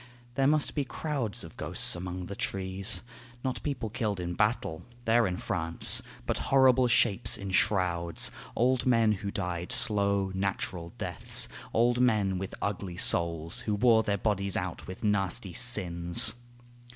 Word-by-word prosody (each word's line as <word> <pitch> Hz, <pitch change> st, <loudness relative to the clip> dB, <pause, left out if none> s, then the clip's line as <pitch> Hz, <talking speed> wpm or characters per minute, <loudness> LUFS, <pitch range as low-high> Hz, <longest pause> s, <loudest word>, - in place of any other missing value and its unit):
There 135 Hz, +2 st, 0 dB
must 150 Hz, 0 st, 0 dB
be 145 Hz, -, -2 dB
crowds 130 Hz, -, -4 dB
of -, -, -12 dB
ghosts -, -, 0 dB
among 90 Hz, +1 st, -7 dB
the 100 Hz, -, -8 dB
trees, 95 Hz, +2 st, -2 dB, 0.4 s
Not 130 Hz, -2 st, -4 dB
people 130 Hz, -7 st, -5 dB
killed 105 Hz, -5 st, -3 dB
in 90 Hz, 0 st, -5 dB
battle, 105 Hz, -5 st, -2 dB, 0.2 s
they're 115 Hz, -1 st, +2 dB
in 90 Hz, -1 st, -4 dB
France, 85 Hz, -2 st, +5 dB, 0.2 s
But -, -, -3 dB
horrible 130 Hz, -2 st, +4 dB
shapes 115 Hz, -4 st, +2 dB
in 100 Hz, -1 st, -7 dB
shrouds 90 Hz, -3 st, +1 dB, 0.2 s
old 130 Hz, +1 st, 0 dB
men 115 Hz, -3 st, +3 dB
who 100 Hz, -1 st, -4 dB
died 90 Hz, -2 st, -5 dB
Slow, 100 Hz, -3 st, +3 dB
natural 95 Hz, -3 st, -4 dB
deaths, -, -, +2 dB, 0.2 s
old 120 Hz, +1 st, +1 dB
men 105 Hz, -6 st, +1 dB
with 95 Hz, 0 st, -7 dB
ugly 100 Hz, -3 st, -5 dB
souls, 85 Hz, -1 st, 0 dB
Who 105 Hz, -, 0 dB
wore 110 Hz, +1 st, +3 dB
their 100 Hz, -2 st, -2 dB
bodies 100 Hz, -1 st, -2 dB
out 90 Hz, -1 st, -6 dB
with 95 Hz, +5 st, -10 dB
nasty 95 Hz, -3 st, -1 dB
sins. 105 Hz, -1 st, +4 dB
100 Hz, 150 wpm, -28 LUFS, 90-120 Hz, 0.4 s, France